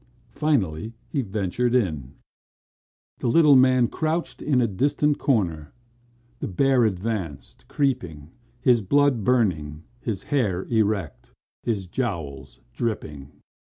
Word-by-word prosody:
Finally 110 - 0 0.2
he 140 - -1
ventured 110 +3 -1
in. 75 - -1 1.0
The - - -2
little 150 +3 +6
man 130 -2 +5
crouched 160 +6 -2
in 140 -4 +2
a 120 - +3
distant 145 +8 +1
corner. 85 - 0 0.7
The - - -3
bear 130 +5 +3
advanced, 95 -6 -4
creeping, 85 - -2 0.3
his 125 -2 +3
blood 140 +2 +2
burning, 85 -11 0 0.2
his 110 -6 -4
hair 105 -10 0
erect, 105 -7 -1 0.3
his 105 -5 -2
jowls 75 - -5
dripping. 75 - -4
110 Hz, 110 wpm, -24 LUFS, 85-130 Hz, 1.0 s, little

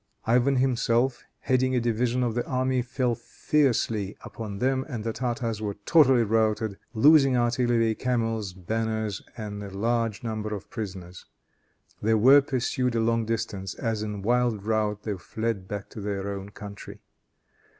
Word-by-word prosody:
Ivan 125 +4 +3
himself, 125 -1 +1 0.2
heading 130 -1 +1
a - - +3
division 120 +2 0
of 120 -2 0
the 120 +1 -1
army, 130 0 +1
fell 125 0 -1
fiercely 115 -7 0
upon 105 -3 -7
them, 130 +4 +1
and 120 -6 -4
the 115 0 -2
Tartars 115 -2 -2
were 105 -2 -3
totally 135 -7 +5
routed, 110 -1 0 0.2
losing 135 +1 +6
artillery, 120 -1 +2
camels, 115 -4 -1
banners 110 +2 -2 0.2
and 105 -2 -5
a 100 - -6
large 115 +2 -1
number 110 -2 -3
of 100 - -10
prisoners. 95 -5 -7 0.8
They 110 +1 +3
were 130 +6 +7
pursued 125 -2 -1
a - - +2
long 115 0 +1
distance 105 -4 -3
as 110 -2 -2
in 105 -2 -4
wild 120 -2 +1
rout 105 -1 0
they 105 -2 -2
fled 110 +2 -3
back 100 0 -5
to 110 - -8
their 100 -1 -3
own 100 0 -7
country. 100 -1 -10
115 Hz, 150 wpm, -26 LUFS, 105-125 Hz, 0.8 s, were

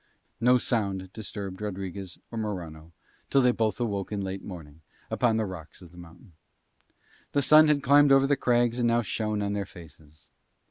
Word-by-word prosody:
No 125 +2 +5
sound 100 -6 -2
disturbed 100 -3 -7
Rodriguez 95 -2 -6
or 115 - -6
Morano 85 -7 -6 0.4
till 125 -3 +4
both 110 0 -1
awoke 100 -5 -2
in 105 - -2
late 95 0 -5
morning 80 -5 -10 0.3
upon 115 -3 +2
the 110 - 0
rocks 90 -5 -9
of 90 -3 -14
the 90 - -17
mountain. 85 +2 -15 1.0
The 140 - +2
sun 155 +3 +7
had 145 -2 +2
climbed 145 +1 +5
over 135 0 +6
the 140 +1 +2
crags 120 -2 +1
and 120 - +2
now 120 0 +2
shone 105 0 -2
on 100 0 -2
their 100 -1 -3
faces. 75 -5 -16
105 Hz, 175 wpm, -27 LUFS, 90-120 Hz, 1.0 s, sun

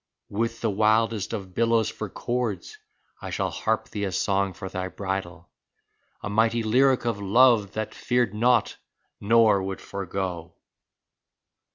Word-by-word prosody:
With 115 +2 -2
the 115 - +1
wildest 110 0 +1
of 100 -5 -6
billows 115 +1 +2
for - - -6
chords 120 -7 -3 0.4
I - - -6
shall - - -2
harp - - -1
thee 105 -1 -3
a 95 - -3
song 95 +2 0
for 95 - -7
thy 95 0 -4
bridal, 95 -2 -5 0.7
A - - -3
mighty 115 +2 +1
lyric 130 +3 +3
of 115 -4 -1
love 110 0 +4
that 110 -1 -4
feared 120 -4 0
not 115 +1 +2 0.4
nor 110 -1 +4
would 95 0 -4
forego 95 -3 -5
105 Hz, 140 wpm, -25 LUFS, 95-115 Hz, 0.7 s, love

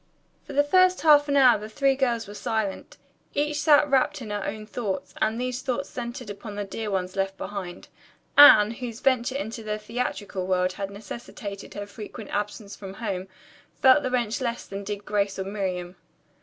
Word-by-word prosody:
For - - -10
the 290 +1 +4
first 370 +4 +4
half 295 -1 +6
hour 265 -5 +6
the 215 +1 -8
three 275 +4 +2
girls 240 -5 0
were 205 - -9
silent. 220 -3 -3 0.4
Each 295 +1 0
sat 295 -1 +5
wrapped 270 -1 +2
in 220 -5 -7
her 205 -1 -2
own 215 +1 -5
thoughts, 195 -5 -4
and 220 +2 +1
those 250 0 -2
thoughts 265 +1 -2
centered 245 0 -6
upon 205 +1 -8
the 205 - -2
dear 210 +2 -5
ones 185 -1 -2
left 195 0 -1
behind. 185 -3 -6 0.5
Anne, 220 -7 +9
whose 235 -1 -6
venture 260 -1 +1
into 230 -4 -4
the 215 -1 -3
theatrical 210 -4 -4
world 185 0 +1
had 195 +1 -4
necessitated 200 0 -8
her 205 0 -4
frequent 210 +1 -9
absence 205 0 -4
from 195 -1 -9
home, 195 -4 -4 0.5
felt 260 +2 +6
the 260 - -2
wrench 240 -1 -1
less 235 -2 -2
than 195 0 -6
did 205 0 -5
Grace 200 -1 0
or 190 - -2
Miriam. 185 -3 -3
215 Hz, 185 wpm, -26 LUFS, 200-255 Hz, 0.5 s, Anne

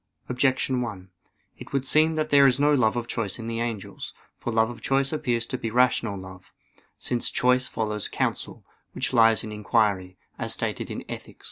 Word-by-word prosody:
Objection 130 0 +1
1: 95 -6 -6 0.5
It - - -11
would 135 -1 0
seem 155 +3 +4
that 155 -1 -1
there 140 -1 +7
is 130 0 +2
no 145 +1 +4
love 120 -6 +3
of 120 -1 -2
choice 110 -4 -3
in 115 -1 -7
the 115 0 -3
angels. 115 -4 -5 0.2
For 120 - -3
love 110 +1 +2
of 120 - -11
choice 135 +2 +1
appears 120 -6 0
to 130 - -4
be 115 - -3
rational 120 -3 +2
love; 95 -1 -11 0.5
since 120 -1 -1
choice 125 +1 +2
follows 105 -2 -2
counsel, - - -3 0.3
which 135 +1 -2
lies 115 -2 +5
in 110 - -6
inquiry, 100 -3 0 0.2
as - - +2
stated - - -2
in - - -5
_Ethic. - - -8
120 Hz, 190 wpm, -25 LUFS, 110-130 Hz, 0.5 s, there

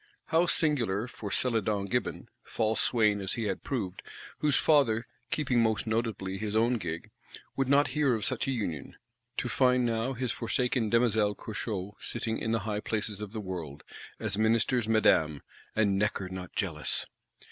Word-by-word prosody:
How 165 +2 +3
singular 120 - +1
for 105 -4 -7
Celadon 110 -4 0
Gibbon, 120 +5 -2
false 110 0 0
swain 105 -4 +3
as 95 - -3
he 115 - -2
had 100 -3 -2
proved; 95 -9 -3 0.4
whose 150 -3 +3
father, 125 -8 +3 0.2
keeping 130 -5 +1
most 110 -1 +1
probably 110 -4 -1
his 105 0 -3
own 115 +2 +3
gig, 85 -3 -5 0.4
"would 135 -1 0
not 140 +1 +4
hear 145 -5 +2
of 110 - -2
such - - 0
a - - +1
union,"—to 100 - -5
find 125 -1 +3
now 115 +2 0
his 125 -1 -2
forsaken 120 -1 0
Demoiselle 110 -3 +3
Curchod 105 -3 -4
sitting 115 -1 -3
in 110 - -2
the 115 -1 +1
high 105 -2 -1
places 105 -1 -2
of 105 -2 -6
the 110 - -4
world, 85 -7 -6 0.4
as - - 0
Minister's 115 +1 +2
Madame, 80 -10 +3 0.3
and 100 -3 +2
"Necker 100 -3 0
not 90 -1 -7
jealous!" - - -2
110 Hz, 160 wpm, -29 LUFS, 100-125 Hz, 0.4 s, not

